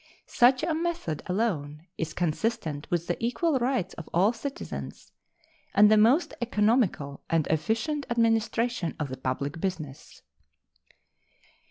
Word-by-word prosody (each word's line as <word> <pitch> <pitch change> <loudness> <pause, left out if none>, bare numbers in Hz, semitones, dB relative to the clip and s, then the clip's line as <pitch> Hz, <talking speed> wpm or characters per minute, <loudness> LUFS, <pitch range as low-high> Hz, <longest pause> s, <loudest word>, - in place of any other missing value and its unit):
Such 255 +3 +4
a 330 0 +1
method 325 - -2
alone 165 -7 -2
is 160 -1 -4
consistent 170 -3 -2
with 170 -1 0
the 175 +5 -3
equal 265 +5 +1
rights 240 -7 0
of 165 - -9
all 195 +7 +3
citizens 265 +4 -7 0.6
and 210 +1 +7
the - - +7
most 235 +11 +4
economical 210 - +1
and 165 -2 +2
efficient 225 - -1
administration 230 -4 +1
of 150 -3 -2
the 130 - -5
public 140 +4 -3
business. 155 -8 -5
210 Hz, 125 wpm, -27 LUFS, 160-240 Hz, 0.6 s, and